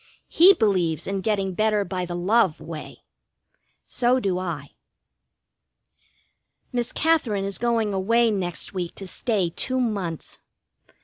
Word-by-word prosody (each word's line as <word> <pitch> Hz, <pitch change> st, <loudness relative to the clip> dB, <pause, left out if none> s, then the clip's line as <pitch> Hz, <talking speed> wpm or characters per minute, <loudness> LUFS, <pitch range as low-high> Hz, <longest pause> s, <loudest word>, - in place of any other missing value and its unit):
He 370 Hz, +4 st, +7 dB
believes 180 Hz, -, +1 dB
in 195 Hz, 0 st, -2 dB
getting 195 Hz, -2 st, -1 dB
better 215 Hz, +1 st, +1 dB
by 180 Hz, 0 st, -3 dB
the 175 Hz, -, -4 dB
love 185 Hz, -1 st, +2 dB
way. 160 Hz, -2 st, -9 dB, 0.8 s
So 250 Hz, +1 st, +1 dB
do 190 Hz, -6 st, -1 dB
I. 160 Hz, -6 st, -5 dB, 2.0 s
Miss 240 Hz, -2 st, -2 dB
Katherine 255 Hz, -12 st, +1 dB
is 195 Hz, 0 st, -1 dB
going 230 Hz, -3 st, 0 dB
away 230 Hz, +4 st, +2 dB
next 185 Hz, -3 st, -3 dB
week 180 Hz, -3 st, -4 dB
to 195 Hz, -, -8 dB
stay 190 Hz, -2 st, -1 dB
two 260 Hz, +8 st, -1 dB
months. 200 Hz, -9 st, -3 dB
200 Hz, 125 wpm, -24 LUFS, 180-230 Hz, 2.0 s, He